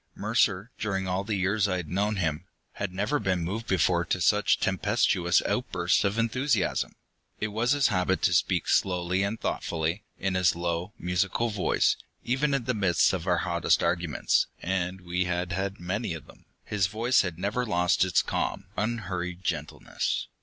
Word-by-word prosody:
Mercer, 105 0 +1
during 95 -4 -1
all 90 +1 -1
the 105 +1 -2
years 100 +2 +1
I 90 -2 0
had 90 -3 -5
known 100 +5 0
him, 85 -2 -1 0.3
had 100 -2 -4
never 105 +10 0
been 95 -4 0
moved 110 +7 -4
before 85 -1 +2
to 95 - -1
such 105 +4 +3
tempestuous 95 -2 +2
outbursts - - +1
of 100 +2 0
enthusiasm. 115 0 0 0.4
It 105 - -1
was 115 +5 +1
his 145 -3 +3
habit 95 -2 0
to 90 - +3
speak 90 0 +2
slowly 90 0 +1
and 100 +3 -1
thoughtfully, 85 +4 -2
in 95 -1 -1
his 90 -2 +3
low, 85 +2 -2
musical 95 +6 0
voice; 100 -3 +2 0.3
even 140 +3 +1
in 130 - -1
the 125 - +1
midst 95 -6 +3
of 90 -1 -3
our 90 -1 +3
hottest 85 -2 +2
arguments, 85 -4 +1
and 95 0 -2
we 90 +1 -1
had 90 0 -2
had 95 +2 -2
many 90 +1 -2
of 80 - -9
them, - - -18 0.2
his 100 -3 0
voice 115 +6 +2
had 90 -5 -4
never 100 +7 -1
lost 90 -7 +2
its 95 -2 +2
calm, - - -2
unhurried 95 -5 -3
gentleness. - - -2
95 Hz, 170 wpm, -27 LUFS, 90-105 Hz, 0.4 s, such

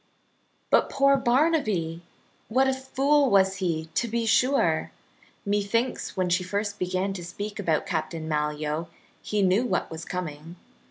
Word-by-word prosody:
But, - - +4
poor 275 0 +4
Barnaby! 240 - +1 0.5
what 260 +4 +3
a 265 - +2
fool 270 +2 +2
was 190 -2 +3
he, 165 -4 -1
to 235 - 0
be 230 +1 -1
sure! 255 +5 +2 0.5
Methinks 205 +5 -1
when 185 -1 +1
she 180 +1 +1
first 205 +2 -3
began 185 +2 -1
to 180 -2 -7
speak 205 +5 -6
about 165 -6 0
Captain 160 0 -3
Malyoe 150 +1 -2 0.3
he 210 -1 0
knew 190 +5 +3
what 190 -9 -1
was 160 +1 -6
coming. 165 -2 -6
195 Hz, 145 wpm, -26 LUFS, 170-240 Hz, 0.5 s, But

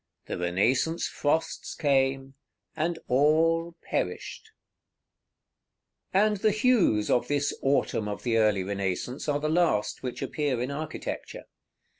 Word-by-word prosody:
The - - -5
Renaissance 120 - +1
frosts 160 +3 -1
came, 135 -2 +1 0.4
and 165 +2 -1
all 165 +5 +2
perished!" 445 - -3 1.7
§ - - +6
XXIV. 210 - +5
And 210 -1 +1
the 215 +3 +2
hues 210 - +2
of 120 0 +2
this 145 +1 0
autumn 135 -5 +1
of 105 - -5
the 115 -2 +1
early 105 -3 +3
Renaissance 100 +8 -3
are 145 0 +1
the 155 - -1
last 160 -10 +1
which 125 -2 -4
appear 145 -5 -1
in 125 +3 -2
architecture. 155 +2 -5
140 Hz, 130 wpm, -27 LUFS, 120-165 Hz, 1.7 s, §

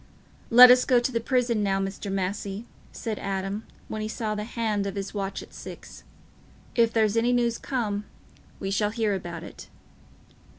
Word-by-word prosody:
"Let 250 +1 +10
us 250 0 +6
go 250 -2 +4
to 240 +2 -1
the 230 - 0
prison 235 -2 +1
now, 195 -1 +1
Mr. 195 +1 -4
Massey," 195 +2 -3 0.3
said 220 -3 -4
Adam, 195 +2 -3 0.2
when 215 - -4
he 215 - -2
saw 220 0 -3
the 210 0 -3
hand 215 -3 -1
of 195 - -4
his 195 -1 -4
watch 195 -1 -3
at - - -16
six. - - -10 0.7
"If 230 -1 +3
there's 220 -2 +2
any 230 +2 +3
news 240 -1 +1
come, 210 -6 -2 0.5
we 195 - -3
shall 205 +1 +1
hear 220 -2 0
about 170 -3 -5
it." - - -11
215 Hz, 175 wpm, -26 LUFS, 195-235 Hz, 0.7 s, Let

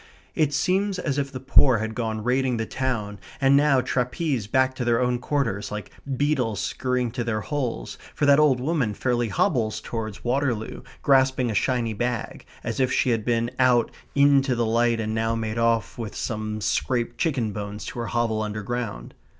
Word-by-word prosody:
It 155 -3 +1
seems 190 +5 +1
as 145 -5 -1
if 140 -1 -2
the 130 - -6
poor 130 -1 +4
had 110 +1 -3
gone 110 -2 -3
raiding 125 0 +1
the 115 - -1
town, 110 -6 -3 0.2
and 135 0 +4
now 140 -2 +4
trapesed 125 - -1
back 130 0 +3
to 130 - -4
their 120 -1 +2
own 125 -1 +1
quarters, 120 -7 -1
like 105 -2 -6 0.3
beetles 130 -8 0
scurrying 125 -2 -1
to 120 +1 -3
their 110 -2 -1
holes, 125 - -3 0.2
for - - +1
that 140 +1 +6
old 145 -4 +4
woman 130 -6 0
fairly 120 0 0
hobbles 110 0 +1
towards 110 -3 -5
Waterloo, 120 -3 -1 0.2
grasping 130 -3 +3
a - - -2
shiny 115 +1 0
bag, 120 +1 -3 0.2
as - - -3
if 130 -1 +2
she 130 - +2
had 115 -2 0
been 115 0 0
out 125 -3 +4 0.2
into 140 -2 +4
the 120 0 +1
light 115 +1 +2
and 110 0 -2
now 115 +1 0
made 110 0 -3
off 115 -2 +1
with 110 -3 -5
some 110 -2 -3
scraped 120 +3 -1
chicken 130 -9 0
bones 105 +1 -6
to - - -6
her 115 - -3
hovel 115 -2 0
underground. 105 - -4
120 Hz, 180 wpm, -24 LUFS, 110-130 Hz, 0.3 s, that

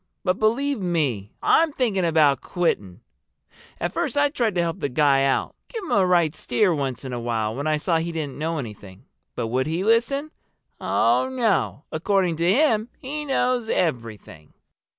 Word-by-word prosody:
But 185 0 0
believe 250 +5 +1
me, 145 - -1
I'm 325 -1 +4
thinking 210 -9 0
about 150 -5 +3
quitting. 105 - -2 0.8
At - - -2
first - - -2
I 290 0 +4
tried 235 - -1
to 175 - +2
help 170 +2 -2
the 145 - -2
guy 135 0 +3
out—give 410 - -3
him - - -6
a 190 -2 +3
right 170 -4 +3
steer 200 -1 +1
once 135 -3 -3
in 130 - -5
a 120 - -3
while 115 -2 -2
when 140 +5 -3
I 155 0 +2
saw 165 +2 +1
he 170 +1 -3
didn't 150 -4 -5
know 165 +1 -2
anything. 105 -7 -9 0.3
But 115 - -3
would 130 +3 0
he 165 +4 -1
listen? 240 +7 +1 0.5
Oh, 260 - +2
no! 225 - 0
According 180 0 0
to 170 +2 +2
him, 235 -3 +2
he 300 +3 -5
knows 250 -4 0
everything." 115 - -3
170 Hz, 170 wpm, -23 LUFS, 135-225 Hz, 0.8 s, I'm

